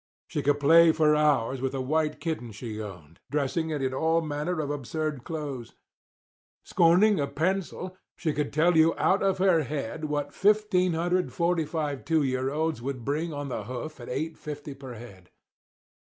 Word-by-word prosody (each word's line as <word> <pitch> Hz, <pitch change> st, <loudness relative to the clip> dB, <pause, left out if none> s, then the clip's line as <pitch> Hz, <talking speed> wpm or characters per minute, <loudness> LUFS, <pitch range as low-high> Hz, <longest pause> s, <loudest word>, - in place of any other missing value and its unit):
She -, -, -3 dB
could 145 Hz, +2 st, +2 dB
play 165 Hz, +3 st, +7 dB
for 155 Hz, -1 st, +3 dB
hours 140 Hz, -4 st, +2 dB
with 135 Hz, 0 st, -2 dB
a -, -, -2 dB
white 155 Hz, +4 st, 0 dB
kitten 155 Hz, -8 st, -4 dB
she 110 Hz, +1 st, -6 dB
owned, 90 Hz, -7 st, -10 dB
dressing 150 Hz, +3 st, -1 dB
it 150 Hz, -3 st, -2 dB
in 130 Hz, 0 st, -1 dB
all 160 Hz, +4 st, +2 dB
manner 155 Hz, +2 st, -2 dB
of 145 Hz, -2 st, -2 dB
absurd 145 Hz, 0 st, -3 dB
clothes. 145 Hz, -8 st, -6 dB, 0.9 s
Scorning 180 Hz, +4 st, +4 dB
a 140 Hz, -, 0 dB
pencil, 185 Hz, +4 st, -2 dB, 0.2 s
she 160 Hz, -4 st, -1 dB
could 145 Hz, 0 st, -2 dB
tell 165 Hz, +3 st, +3 dB
you 160 Hz, +1 st, +5 dB
out 195 Hz, -, +2 dB
of 195 Hz, -1 st, +2 dB
her 185 Hz, -3 st, +4 dB
head 150 Hz, +1 st, -4 dB
what 145 Hz, -1 st, -2 dB
1545 175 Hz, -6 st, +1 dB
two 160 Hz, -2 st, +2 dB
year 130 Hz, 0 st, 0 dB
olds 155 Hz, -2 st, -1 dB
would 130 Hz, -2 st, -5 dB
bring 155 Hz, +4 st, -1 dB
on 145 Hz, -1 st, -5 dB
the 110 Hz, -5 st, -4 dB
hoof, 130 Hz, +6 st, -6 dB
at 120 Hz, -, -9 dB
$8.50 145 Hz, 0 st, -5 dB
per 130 Hz, -3 st, -8 dB
head. 100 Hz, -6 st, -12 dB
150 Hz, 165 wpm, -27 LUFS, 135-165 Hz, 0.9 s, play